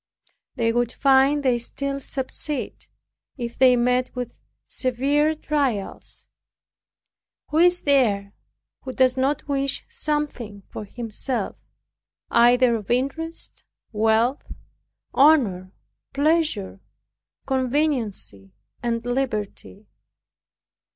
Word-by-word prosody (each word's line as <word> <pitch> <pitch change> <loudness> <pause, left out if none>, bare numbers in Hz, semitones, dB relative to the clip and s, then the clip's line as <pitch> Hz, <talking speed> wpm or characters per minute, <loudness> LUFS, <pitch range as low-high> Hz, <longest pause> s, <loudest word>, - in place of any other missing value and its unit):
They 230 -3 +1
would 240 0 +1
find 275 +2 +3
they 250 -3 +2
still 275 +3 -4
subsist, 275 +2 -5 0.5
if 235 -2 -5
they 255 -1 +5
met 250 +1 +1
with 245 -1 -6 0.3
severe 280 +5 0
trials. 280 -10 -3 1.2
Who 310 - +1
is 355 +1 +4
there 215 -8 +2 0.5
who 260 - -6
does 255 -1 +3
not 275 +3 0
wish 275 -1 -1
something 295 - -3
for 215 - -6
himself, 230 0 -4 0.8
either 245 0 +5
of 210 -3 -10
interest, 275 +7 -3 0.3
wealth, 225 +4 +1 0.6
honor, 235 -11 +4 0.4
pleasure, 290 - 0 0.7
conveniency 255 - -1 0.3
and 235 -1 -2
liberty. 215 -5 -3
255 Hz, 90 wpm, -23 LUFS, 230-280 Hz, 1.2 s, they